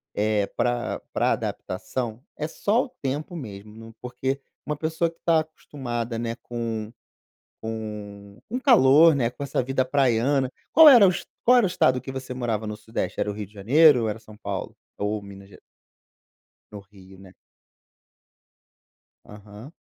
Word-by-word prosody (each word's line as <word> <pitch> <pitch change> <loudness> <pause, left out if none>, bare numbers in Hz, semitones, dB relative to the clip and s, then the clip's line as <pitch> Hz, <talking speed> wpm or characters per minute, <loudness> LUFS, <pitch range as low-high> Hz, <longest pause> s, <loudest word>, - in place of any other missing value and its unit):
eh, 105 -1 +1
pra 120 -1 -1
pra - - +2
adaptação 115 +5 -4
é 150 - -3
só 210 +9 0
o - - -14
tempo 145 +5 -3
mesmo, 105 -7 -9
no 115 0 -12
porque 130 +2 -3 0.2
uma 150 - -2
pessoa 160 +2 -1
que 165 - -20
está 165 -2 +3
acostumada, 120 -7 -5
né, 115 0 -3
com 115 -2 -4 0.7
com 105 -2 -7
o 245 - -2
calor, 165 - +6
né, 125 -4 +1
com 125 - -10
essa 140 -1 -1
vida 130 +1 0
praiana. 130 0 +1 0.2
Qual 320 -1 +9
era 240 -8 +9
o 185 - +5
es - - -4
o - - -21 0.2
qual 250 +1 +6
era 235 - +4
o - - 0
estado 130 -7 +2
que 135 - -8
você 130 -1 -6
morava 115 -4 -2
no 105 0 -5
sudeste, 110 +2 -5
era - - 0
o - - -5
Rio 105 0 -6
de 100 - -24
Janeiro 130 +6 +5
ou 110 - 0
era 105 +1 -3
São 110 -1 -15
Paulo? 100 -2 -5 0.2
Ou 105 +1 -2
Minas 100 -1 -12
Ge - - -16 1.1
No 105 - -8
Rio, 95 -1 -16
né. 95 -1 -15 1.9
Aham. 105 +5 -12
120 Hz, 170 wpm, -24 LUFS, 105-145 Hz, 1.9 s, Qual